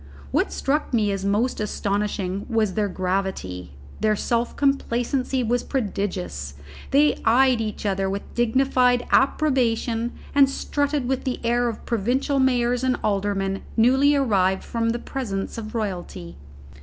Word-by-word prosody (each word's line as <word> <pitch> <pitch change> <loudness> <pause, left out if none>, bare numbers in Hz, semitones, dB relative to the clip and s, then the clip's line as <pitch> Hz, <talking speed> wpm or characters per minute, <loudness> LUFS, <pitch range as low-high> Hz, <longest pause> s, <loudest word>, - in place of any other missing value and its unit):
What - - +1
struck 275 -2 -1
me 210 -3 +2
as 195 -1 -3
most 210 +6 0
astonishing 200 -2 -2
was 220 -4 +1
their 210 0 0
gravity. 180 - -3 0.3
Their 215 0 +2
self 235 +3 -1
complacency 260 -1 0
was 240 +1 +1
prodigious; 135 - -3 0.3
they 290 +2 +3
eyed 250 +1 +4
each 215 -1 -4
other 195 -1 0
with 200 +1 -3
dignified 245 +1 +2
approbation, 240 -5 +1 0.2
and 280 -1 +5
strutted 285 -1 -1
with 265 0 -1
the 255 - -2
air 240 +1 +2
of 225 - -8
provincial 245 +5 0
mayors 250 -1 +2
and 255 -1 +1
aldermen 195 -1 -1 0.2
newly 265 +5 +4
arrived 195 -8 +2
from 230 -1 -1
the 235 - 0
presence 230 -5 -4
of 215 +1 -7
royalty. 180 - -4
230 Hz, 135 wpm, -23 LUFS, 200-255 Hz, 0.3 s, and